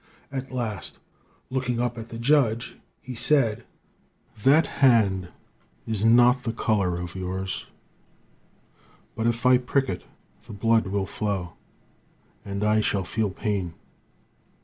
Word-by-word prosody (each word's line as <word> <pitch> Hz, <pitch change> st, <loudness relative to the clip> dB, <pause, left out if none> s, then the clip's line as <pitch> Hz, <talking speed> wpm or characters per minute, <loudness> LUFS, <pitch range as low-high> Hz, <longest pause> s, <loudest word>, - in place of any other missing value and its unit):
At 135 Hz, -1 st, -5 dB
last, 110 Hz, -9 st, -4 dB, 0.5 s
looking 125 Hz, -2 st, -1 dB
up 120 Hz, -1 st, -1 dB
at 115 Hz, 0 st, -8 dB
the 115 Hz, -, -7 dB
judge, 120 Hz, -2 st, +2 dB, 0.3 s
he 130 Hz, -, -7 dB
said: 120 Hz, -2 st, +2 dB, 0.8 s
"'That 145 Hz, +7 st, +5 dB, 0.2 s
hand 105 Hz, -8 st, +4 dB, 0.6 s
is 110 Hz, -2 st, -1 dB
not 120 Hz, +3 st, +5 dB
the 115 Hz, -2 st, -3 dB
color 100 Hz, -6 st, 0 dB
of 90 Hz, 0 st, -6 dB
yours, 95 Hz, 0 st, -4 dB, 1.5 s
but 115 Hz, +1 st, 0 dB
if 115 Hz, +1 st, -1 dB
I 125 Hz, 0 st, +6 dB
prick 135 Hz, +2 st, 0 dB
it, 90 Hz, -, -5 dB, 0.4 s
the -, -, -8 dB
blood 115 Hz, +1 st, +2 dB
will 100 Hz, 0 st, -1 dB
flow, 95 Hz, -5 st, -3 dB, 0.9 s
and 100 Hz, +1 st, -4 dB
I 105 Hz, +1 st, +3 dB
shall 100 Hz, -2 st, 0 dB
feel 105 Hz, +4 st, -1 dB
pain. 95 Hz, -3 st, -3 dB
115 Hz, 125 wpm, -25 LUFS, 100-125 Hz, 1.5 s, I